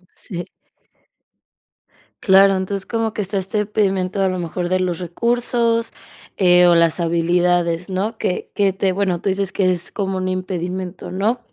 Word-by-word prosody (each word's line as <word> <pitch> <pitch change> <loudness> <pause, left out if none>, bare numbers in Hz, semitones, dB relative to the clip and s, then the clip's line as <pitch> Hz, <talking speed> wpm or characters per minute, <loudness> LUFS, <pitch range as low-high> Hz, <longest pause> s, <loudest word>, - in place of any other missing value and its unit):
Sí. 175 -2 -6 1.8
Claro, 195 0 +6
entonces 190 +1 -3
como 225 -1 -2
que 210 - -2
está 195 +2 -3
este 195 +3 -2
impedimento 195 -2 0
a 190 - +3
lo 185 -1 -1
mejor 175 +1 -3
de 185 0 +1
los 180 -2 -1
recursos, 235 +5 0 0.5
eh, 180 -2 +5
o 175 - +5
las 170 +1 +3
habilidades, 170 +1 +1
¿no?, 205 +4 -2
que 180 - -2
que 200 -2 +2
te 195 -1 0
bueno, 185 -2 0
tú 195 - -1
dices 195 0 -1
que 185 -2 +2
es 175 -1 -3
como 195 -2 -2
un 185 - -2
impedimento, 185 0 -4
¿no?, 205 +7 0
185 Hz, 160 wpm, -20 LUFS, 180-200 Hz, 1.8 s, Claro